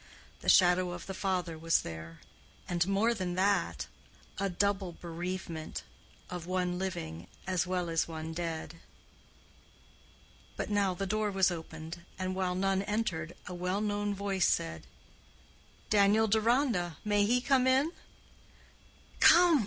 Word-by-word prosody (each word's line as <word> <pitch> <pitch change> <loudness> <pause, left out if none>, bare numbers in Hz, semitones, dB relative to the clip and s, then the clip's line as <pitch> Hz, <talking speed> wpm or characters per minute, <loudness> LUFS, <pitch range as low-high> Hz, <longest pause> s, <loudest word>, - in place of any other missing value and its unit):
The - - -1
shadow 180 -1 +5
of 175 -1 -7
the 195 - -5
father 180 -4 -2
was 165 0 +3
there, 80 0 -8 0.5
and 175 0 +1
more 205 +4 +3
than 185 -5 -3
that, 200 +2 +1 0.5
a 195 0 0
double 195 -1 0
bereavement—of 170 0 -7
one 180 -1 -1
living 85 - -4 0.2
as 180 -2 0
well 180 -1 -1
as 165 -1 +1
one 160 0 -5
dead. 165 0 -4 1.8
But - - -3
now 200 -3 +2
the 195 - -2
door 215 +2 0
was 190 -2 +3
opened, 160 0 -7 0.2
and 185 0 -2
while 185 -1 -1
none 195 +1 +1
entered, 195 -6 -2
a 180 - -6
well 180 +2 -1
known 205 -1 -1
voice 195 -2 +1
said: 80 -1 -1 1.0
"Daniel 210 +1 +5
Deronda—may 210 - +2
he 245 +3 +3
come 260 0 +3
in?" 270 +5 +3 1.3
"Come! 345 -3 +7
185 Hz, 130 wpm, -31 LUFS, 170-205 Hz, 1.8 s, Come